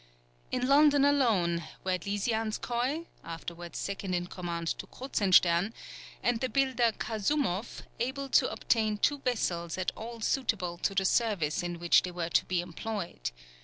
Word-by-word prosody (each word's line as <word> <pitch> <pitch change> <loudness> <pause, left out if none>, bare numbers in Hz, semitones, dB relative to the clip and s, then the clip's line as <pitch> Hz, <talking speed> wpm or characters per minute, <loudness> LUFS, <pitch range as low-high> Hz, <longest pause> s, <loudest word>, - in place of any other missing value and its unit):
In 250 0 0
London 285 0 +6
alone 215 -12 +3 0.2
were 185 -1 0
Lisianskoï, 225 - -1 0.2
afterwards 170 +1 -7
second 195 -2 -3
in 175 0 -1
command 170 -2 -4
to - - -6
Kruzenstern, 190 -5 +3 0.5
and 240 -1 +1
the 255 - 0
builder 255 -4 +2
Kasoumoff, 220 -2 -1 0.2
able 265 +4 -2
to - - +4
obtain 215 -2 +1
two 285 +7 +2
vessels 175 -10 -1
at 185 -1 -1
all 230 +1 -7
suitable 205 -8 -1
to 195 - -1
the 190 0 +2
service 190 -9 +1
in 175 0 -4
which 170 0 +5
they 180 - -4
were 175 -1 -3
to - - +2
be 180 -1 0
employed. 175 - -4
205 Hz, 145 wpm, -30 LUFS, 175-245 Hz, 0.5 s, London